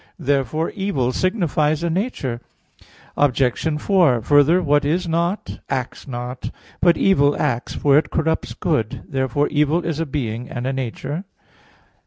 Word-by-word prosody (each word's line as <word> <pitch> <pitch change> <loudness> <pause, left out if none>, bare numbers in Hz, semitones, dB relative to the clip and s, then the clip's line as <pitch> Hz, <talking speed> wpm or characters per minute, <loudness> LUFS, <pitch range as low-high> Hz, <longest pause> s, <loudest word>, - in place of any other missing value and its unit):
Therefore 140 +3 0
evil 170 - -1
signifies 160 - 0
a 170 - 0
nature. 160 - -2 0.7
Obj. 145 +2 +1
4: 155 - +3
Further, 145 +6 +5
what 145 -4 +2
is 170 +5 0
not, 170 +4 -1
acts 130 +1 -4
not. 125 0 -5 0.3
But 170 -1 +4
evil 145 -7 +3
acts, 125 -5 -1
for 145 0 +4
it - - -5
corrupts 160 0 -1
good. 135 - -1
Therefore 135 +2 0
evil 150 +3 +1
is 160 -2 -2
a 165 - -1
being 125 -4 -3
and 120 0 -4
a 135 - -1
nature. 135 - -4
145 Hz, 140 wpm, -21 LUFS, 130-165 Hz, 0.7 s, Further